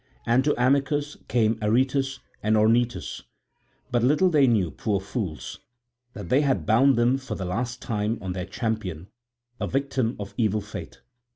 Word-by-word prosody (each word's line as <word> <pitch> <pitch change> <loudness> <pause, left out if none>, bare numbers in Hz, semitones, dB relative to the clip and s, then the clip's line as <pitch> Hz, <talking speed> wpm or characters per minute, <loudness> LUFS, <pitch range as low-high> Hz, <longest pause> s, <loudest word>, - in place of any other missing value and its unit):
And 120 +3 +3
to 150 - +1
Amycus 140 +3 +1
came 115 -2 +2
Aretus 130 +4 +1 0.2
and 110 +1 +2
Ornytus, 115 +3 +1 0.7
but 120 -1 +2
little 150 +9 +3
they 145 -4 +5
knew, 100 -9 +2
poor 105 -3 -1
fools, 95 - -5 0.5
that - - -8
they 130 +3 +4
had 140 -3 +1
bound 130 +5 +5
them 120 +3 +2
for 135 - -6
the 95 - -4
last 120 +7 -3
time 110 -1 -1
on 95 -3 -4
their 90 +1 -4
champion, 100 -6 -3 0.5
a - - -1
victim 135 -3 -1
of 100 -1 -7
evil 110 -2 +2
fate. - - -9
120 Hz, 160 wpm, -25 LUFS, 105-135 Hz, 0.7 s, they